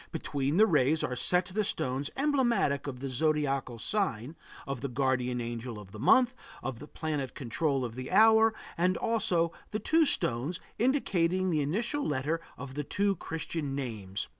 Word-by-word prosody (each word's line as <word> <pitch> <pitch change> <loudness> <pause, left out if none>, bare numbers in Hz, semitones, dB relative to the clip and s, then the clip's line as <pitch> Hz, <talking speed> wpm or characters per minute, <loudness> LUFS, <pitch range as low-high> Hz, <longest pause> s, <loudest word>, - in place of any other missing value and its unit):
Between 140 +3 -1
the 215 - +7
rays 155 -5 +2
are 125 - -1
set 180 +7 +2
the 205 +4 -1
stones 135 -5 -2
emblematic 245 - +1
of 130 -3 -6
the 135 - -3
zodiacal 135 -2 0
sign, 145 - -1 0.3
of 135 -3 -4
the 140 - -2
guardian 125 -1 0
angel 120 0 -5
of 100 -2 -11
the 105 - -9
month, 250 - +5 0.3
of 125 -2 -4
the 150 - -9
planet 150 -6 -4
control 135 +1 -1
of 115 - -6
the 130 +1 -6
hour 220 +1 +6 0.3
and 180 +2 +2
also 185 -7 +1 0.2
the 215 - -2
two 320 +6 +3
stones 135 - +1 0.2
indicating 185 -8 +1
the 155 -2 +1
initial 230 - -1
letter 150 +4 -1 0.2
of 135 -2 -7
the 150 +2 -3
two 200 +6 0
Christian 160 -3 -4
names. 105 -8 -4
145 Hz, 165 wpm, -30 LUFS, 130-185 Hz, 0.3 s, the